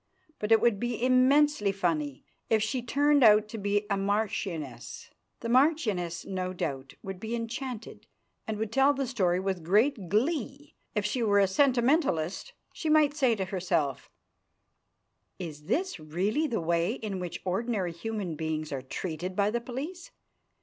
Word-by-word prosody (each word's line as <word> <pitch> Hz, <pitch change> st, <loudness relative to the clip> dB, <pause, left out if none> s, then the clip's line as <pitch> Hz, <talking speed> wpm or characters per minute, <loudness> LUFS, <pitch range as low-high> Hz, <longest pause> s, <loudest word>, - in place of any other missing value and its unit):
But 210 Hz, +1 st, -3 dB
it 225 Hz, -, +7 dB
would 235 Hz, -4 st, +3 dB
be 240 Hz, 0 st, -2 dB
immensely 255 Hz, -3 st, +4 dB
funny 160 Hz, -8 st, -2 dB, 0.2 s
if 220 Hz, -1 st, +3 dB
she 245 Hz, +3 st, -1 dB
turned 285 Hz, +3 st, +3 dB
out 210 Hz, -1 st, +6 dB
to 225 Hz, -, -6 dB
be 205 Hz, +1 st, 0 dB
a 200 Hz, -, +1 dB
marchioness. 195 Hz, -, -3 dB, 0.3 s
The 230 Hz, -, -4 dB
marchioness, 235 Hz, -, +2 dB
no 185 Hz, -1 st, -3 dB
doubt, 135 Hz, -6 st, -4 dB
would 190 Hz, -1 st, -6 dB
be 220 Hz, +3 st, -3 dB
enchanted, 235 Hz, 0 st, -6 dB, 0.4 s
and 220 Hz, -1 st, -2 dB
would 220 Hz, 0 st, -3 dB
tell 270 Hz, +3 st, +4 dB
the 275 Hz, 0 st, -1 dB
story 185 Hz, -8 st, +1 dB
with 190 Hz, -3 st, -2 dB
great 205 Hz, -, +2 dB
glee. 275 Hz, -, -1 dB, 0.2 s
If 210 Hz, -1 st, 0 dB
she 225 Hz, +4 st, -1 dB
were 205 Hz, -3 st, +3 dB
a 200 Hz, -, +6 dB
sentimentalist, 245 Hz, -, +1 dB, 0.2 s
she 315 Hz, -, -3 dB
might 305 Hz, -2 st, +4 dB
say 260 Hz, -6 st, +2 dB
to 195 Hz, -3 st, -2 dB
herself: 175 Hz, -8 st, -1 dB, 1.3 s
"Is 150 Hz, -4 st, -7 dB
this 365 Hz, -, -1 dB
really 190 Hz, -, -1 dB
the 230 Hz, -, -2 dB
way 170 Hz, +4 st, +1 dB
in 210 Hz, -6 st, -5 dB
which 175 Hz, -1 st, -5 dB
ordinary 195 Hz, -1 st, -1 dB
human 195 Hz, 0 st, -4 dB
beings 155 Hz, 0 st, -3 dB
are 135 Hz, -2 st, -3 dB
treated 175 Hz, +6 st, -5 dB
by 205 Hz, +1 st, +2 dB
the 235 Hz, +1 st, -1 dB
police? 295 Hz, +9 st, -6 dB
210 Hz, 155 wpm, -29 LUFS, 180-255 Hz, 1.3 s, it